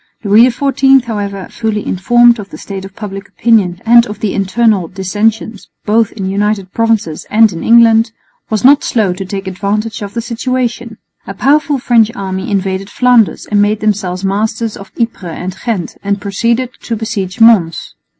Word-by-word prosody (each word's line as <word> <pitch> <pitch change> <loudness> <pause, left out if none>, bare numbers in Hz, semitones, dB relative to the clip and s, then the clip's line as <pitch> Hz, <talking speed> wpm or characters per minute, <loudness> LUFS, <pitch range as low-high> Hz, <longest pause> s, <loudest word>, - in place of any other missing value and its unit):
Louis 215 +4 +5
XIV, 270 +1 +2
however, 200 -5 -5
fully 220 -2 -3
informed 240 +5 +3
of 200 -1 -8
the - - -10
state 195 -1 -7
of 195 0 -12
public 195 -2 -7
opinion 205 -6 +1
and 235 +1 +5
of 210 0 -8
the 210 -3 -2
internal 200 -1 +1
dissensions 205 +3 -2 0.2
both 220 +1 +2
in 200 - -6
the 190 - -2
United 200 -1 -1
Provinces 225 -9 -1
and 220 -1 +4
in 165 - -6
England, 230 -1 +5 0.4
was 215 +1 -1
not 285 +2 +6
slow 210 -6 0
to 190 +2 -6
take 195 0 -6
advantage 200 +3 -3
of 205 +1 -7
the 230 - -1
situation. 240 -1 -3 0.3
A 195 - -6
powerful 290 +5 +2
French 235 -4 +3
army 190 -2 -4
invaded 195 -1 -2
Flanders 245 -4 +2
and 205 -1 +1
made 205 +1 +1
themselves 195 -3 -2
masters 220 +3 -2
of 195 - -12
Ypres 200 -8 -3
and 185 +1 -5
Ghent 205 -8 -3
and 200 0 -1
proceeded 235 +5 -1
to 230 - -3
besiege 210 -4 -4
Mons. 215 -8 +3
210 Hz, 170 wpm, -13 LUFS, 195-230 Hz, 0.4 s, not